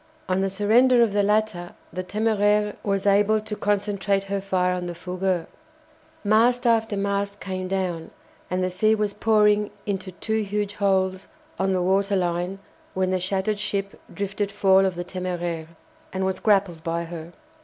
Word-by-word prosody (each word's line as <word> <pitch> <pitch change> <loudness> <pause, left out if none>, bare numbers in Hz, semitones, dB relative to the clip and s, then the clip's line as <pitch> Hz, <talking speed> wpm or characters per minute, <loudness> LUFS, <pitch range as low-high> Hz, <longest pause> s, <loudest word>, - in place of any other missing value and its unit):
On 185 +1 +1
the 195 - +1
surrender 235 +5 +4
of 220 -4 0
the 205 - +3
latter 205 -4 0 0.2
the 185 - -3
"Téméraire" 210 0 +1
was 195 -1 -1
able 205 +2 +4
to 215 0 -6
concentrate 200 -1 0
her 195 0 -3
fire 185 -2 +1
on 180 -1 -3
the 175 - -5
"Fougueux." 180 0 -2 0.8
Mast 235 +4 +3
after 225 -3 +2
mast 200 0 -1
came 185 -1 -4
down, 185 -4 -2 0.4
and 185 0 0
the 185 - 0
sea 215 +4 +3
was 210 -1 -1
pouring 210 -1 +3 0.2
into 195 -2 -3
two 220 +5 -1
huge 205 0 -2
holes 190 -2 0 0.3
on 190 0 +1
the 180 -1 +1
water 195 +2 +2
line 180 +1 -1 0.4
when 185 0 +1
the 185 - +1
shattered 195 +3 -1
ship 200 -1 -3
drifted 200 0 -3
foul 195 0 +4
of 185 - -3
the 175 0 -4
"Téméraire," 175 -3 -4 0.4
and 190 0 -2
was 190 0 -1
grappled 195 -6 +2
by 170 +1 -1
her. 170 0 -8
195 Hz, 165 wpm, -24 LUFS, 185-210 Hz, 0.8 s, surrender